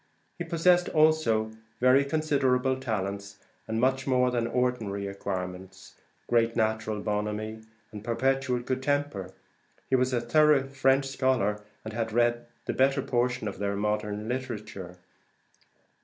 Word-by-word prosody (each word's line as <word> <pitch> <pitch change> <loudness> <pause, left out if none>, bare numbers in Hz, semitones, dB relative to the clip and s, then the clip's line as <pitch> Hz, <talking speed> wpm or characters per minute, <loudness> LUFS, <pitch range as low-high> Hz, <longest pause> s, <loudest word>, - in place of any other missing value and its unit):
He - - -3
possessed 175 +1 +3
also 155 -9 +3 0.3
very 130 +2 +5
considerable 135 -4 +1
talents, 100 -4 -3 0.3
and 110 0 -1
much 130 +2 +1
more 125 -1 +3
than 120 -1 0
ordinary 115 -5 -1
acquirements, 95 -1 -6 0.3
great 115 -1 +2
natural 110 -2 0
bonhommie, 105 +1 -3 0.3
and 105 -2 -8
perpetual 125 +2 0
good 130 +1 -2
temper. 145 -9 -1 0.6
He - - +5
was 130 0 +2
a 125 - +1
thorough 150 +1 +4
French 135 0 +2
scholar, 130 -6 0 0.2
and 110 - -6
had 115 -1 -2
read 120 +1 +1 0.2
the - - -1
better 135 +1 +2
portion 125 0 0
of - - -5
their 100 0 -1
modern 105 +1 -2
literature. 105 -8 -5
120 Hz, 130 wpm, -28 LUFS, 105-130 Hz, 0.6 s, very